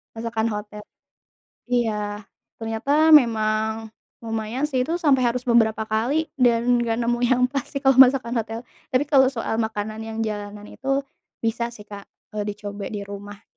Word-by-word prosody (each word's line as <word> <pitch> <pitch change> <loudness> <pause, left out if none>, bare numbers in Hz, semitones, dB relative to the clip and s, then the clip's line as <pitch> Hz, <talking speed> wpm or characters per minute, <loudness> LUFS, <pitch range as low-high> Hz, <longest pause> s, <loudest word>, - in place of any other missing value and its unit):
Masakan 225 0 -2
hotel. 210 0 -6 0.9
Iya. 210 -4 -1 0.3
Ternyata 275 +8 +1
memang 220 -3 +2 0.3
lumayan 225 +3 -3
sih 255 -1 0
itu 330 - -1
sampai 265 -5 +4
harus 250 - -3
beberapa 225 -3 +3
kali 240 +9 -1
dan 245 -1 +3
nggak 235 -1 0
nemu 240 +1 0
yang 250 0 +2
pas 275 -2 -3
sih 275 - -5
kalau 265 -1 +4
masakan 255 -2 +6
hotel. 225 +1 -4 0.3
Tapi 255 +3 +3
kalau 270 -3 +5
soal 230 -3 -3
makanan 215 -1 -3
yang 225 0 -6
jalanan 205 -1 -5
itu 270 +1 -2 0.4
bisa 235 +1 -1
sih 210 - -11
Kak, 200 -1 -9 0.3
eee, 210 -1 -2
dicoba 205 -1 -6
di 205 -2 -5
rumah. 205 +1 -9
225 Hz, 155 wpm, -23 LUFS, 215-250 Hz, 0.9 s, masakan